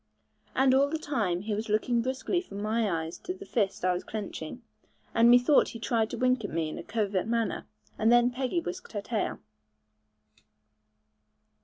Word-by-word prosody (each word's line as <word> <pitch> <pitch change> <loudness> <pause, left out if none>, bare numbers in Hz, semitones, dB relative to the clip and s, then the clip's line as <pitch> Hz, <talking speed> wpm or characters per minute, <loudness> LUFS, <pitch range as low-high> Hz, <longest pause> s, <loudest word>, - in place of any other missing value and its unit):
And 265 0 +4
all 275 +2 +4
the 320 - -1
time 220 - -1
he 210 +1 -3
was 215 +2 -3
looking 230 +3 +2
briskly 260 +8 -1
from 200 - -9
my 215 +1 0 0.2
eyes 165 - -8
to 365 - -5
the 395 +1 -10
fist 200 - -1
I 185 - +3
was 180 - -3
clenching, 210 0 -6 0.5
and 230 +1 +5
methought 245 +4 +6
he 230 - -7
tried 225 0 0
to - - -5
wink 255 -2 +2
at 205 - -3
me 160 -1 -1
in - - -6
a - - -6
covert 205 -3 -1
manner; 230 -1 -1 0.3
and 220 +1 +4
then 240 +1 +5
Peggy 260 +7 -1
whisked 360 -4 -7
her 205 - -2
tail. 220 0 -2
230 Hz, 180 wpm, -29 LUFS, 205-255 Hz, 0.5 s, methought